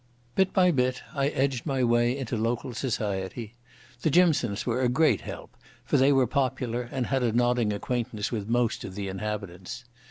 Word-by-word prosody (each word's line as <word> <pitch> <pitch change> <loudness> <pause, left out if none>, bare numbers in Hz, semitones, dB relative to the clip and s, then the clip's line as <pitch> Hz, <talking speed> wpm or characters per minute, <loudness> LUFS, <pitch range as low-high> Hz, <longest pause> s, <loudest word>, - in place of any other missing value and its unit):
Bit 190 -1 +2
by 180 -2 +4
bit 125 -3 0
I 140 -1 +1
edged 135 -2 -1
my 135 -3 +1
way 120 +1 +3
into 130 -3 -3
local 115 +3 -1
society. 105 -2 -3 0.5
The - - +2
Jimsons 145 - +3
were 125 +1 0
a 125 - +3
great 155 +6 +3
help, - - -9 0.3
for - - +2
they 135 +2 +5
were 135 -2 +4
popular 125 -2 -1
and 130 -2 -1
had 135 +1 0
a 120 -2 +2
nodding 120 -1 +2
acquaintance 110 0 -2
with 110 -3 -3
most 120 0 +1
of 95 - -7
the 100 -1 -4
inhabitants. 95 -2 -5
120 Hz, 180 wpm, -27 LUFS, 110-130 Hz, 0.5 s, they